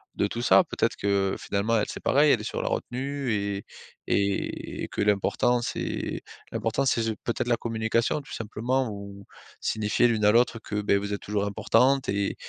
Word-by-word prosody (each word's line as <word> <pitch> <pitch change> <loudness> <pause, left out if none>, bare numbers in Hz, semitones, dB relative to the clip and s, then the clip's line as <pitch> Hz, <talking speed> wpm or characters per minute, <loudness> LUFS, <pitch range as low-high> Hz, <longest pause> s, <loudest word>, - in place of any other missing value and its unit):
de - - +1
tout - - -4
ça - - +6
peut-être - - -1
que, 100 -1 +1
finalement, 105 +3 0
elle 105 - +1
c'est - - -6
pareil. 145 +2 +4
Elle 115 - +3
est - - -7
sur 105 - -3
la - - -1
retenue 135 +1 -2
et 100 -1 -2 0.4
et 100 0 -1
que - - -2
l'important 105 +4 +2
c'est - - -3 0.3
l'important 115 +5 0
c'est 115 - +2
ju 110 -1 -1
peut-être 120 0 -2
la 120 - +3
communication, 115 +3 0
tout 140 - -12
simplement. 120 +4 -1
Ou 100 -1 -9 0.4
signifier 110 +3 +2
l'une 110 -3 +1
à 105 - +7
l'autre 120 +1 +3
que, 105 -1 -3
beh, 100 -1 +3
vous 100 +1 -3
êtes 100 - -4
toujours 105 -1 -1
importantes 125 +6 +2
et 100 0 0
110 Hz, 185 wpm, -26 LUFS, 100-120 Hz, 0.4 s, à